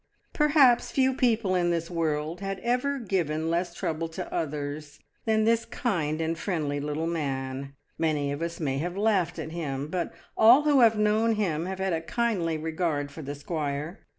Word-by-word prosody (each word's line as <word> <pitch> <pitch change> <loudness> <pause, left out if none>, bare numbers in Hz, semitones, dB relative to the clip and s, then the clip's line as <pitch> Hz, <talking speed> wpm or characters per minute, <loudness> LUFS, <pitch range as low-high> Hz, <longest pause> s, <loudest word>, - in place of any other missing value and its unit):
Perhaps 285 -5 +4
few 265 -1 +2
people 230 -6 +1
in 175 -1 +2
this 170 0 -1
world 160 0 -1
had 195 0 -3
ever 250 +5 0
given 165 - -1
less 170 0 -1
trouble 165 0 -2
to 175 +2 -6
others 145 -1 -4 0.3
than 220 -1 +2
this 230 0 +3
kind 170 - -1
and 165 0 -1
friendly 150 -7 -1
little 150 +2 -2
man; 135 -4 -3 0.2
many 150 -3 +1
of 145 +2 -4
us 170 0 -3
may 135 -4 -1
have 175 +4 -3
laughed 200 -5 +1
at 160 - -5
him, 145 -4 -4
but 175 0 -2 0.2
all 240 +6 +7
who 295 -2 +4
have 225 -3 +5
known 215 +2 +2
him 175 -5 -1
have 190 0 -4
had 190 -1 -1
a 160 - -1
kindly 185 -6 0
regard 155 -2 -2
for 160 - -8
the 145 0 -5
squire. 150 +3 -4
170 Hz, 180 wpm, -27 LUFS, 150-215 Hz, 0.3 s, all